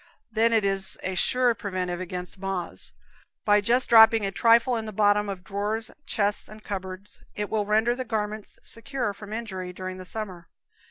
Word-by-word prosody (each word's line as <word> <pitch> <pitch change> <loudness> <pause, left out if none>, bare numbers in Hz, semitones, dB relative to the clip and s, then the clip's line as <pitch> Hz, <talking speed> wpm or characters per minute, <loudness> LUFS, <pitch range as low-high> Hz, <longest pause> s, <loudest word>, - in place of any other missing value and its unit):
Then 225 +1 +3
it 220 -3 +3
is 195 -1 0
a 185 - -2
sure 250 +6 +3
preventive 185 -5 -3
against 180 +1 -6
moths: 195 -2 -1 0.5
by 210 0 +5
just 240 +5 +2
dropping 225 -2 +7
a 195 - -1
trifle 230 +4 +4
in 225 -1 -3
the 215 - -5
bottom 205 0 +3
of 190 -2 -5
drawers, 210 +4 -2 0.2
chests 205 -1 0
and 215 0 -12
cupboards, 190 0 -6 0.2
it 210 0 -3
will 210 -2 0
render 220 +3 +3
the 255 +1 -4
garments 215 -2 -4
secure 245 -2 -3
from 210 +1 -11
injury 190 -5 -4
during 185 0 -6
the 185 - -9
summer. 185 -5 -6
210 Hz, 175 wpm, -26 LUFS, 190-225 Hz, 0.5 s, dropping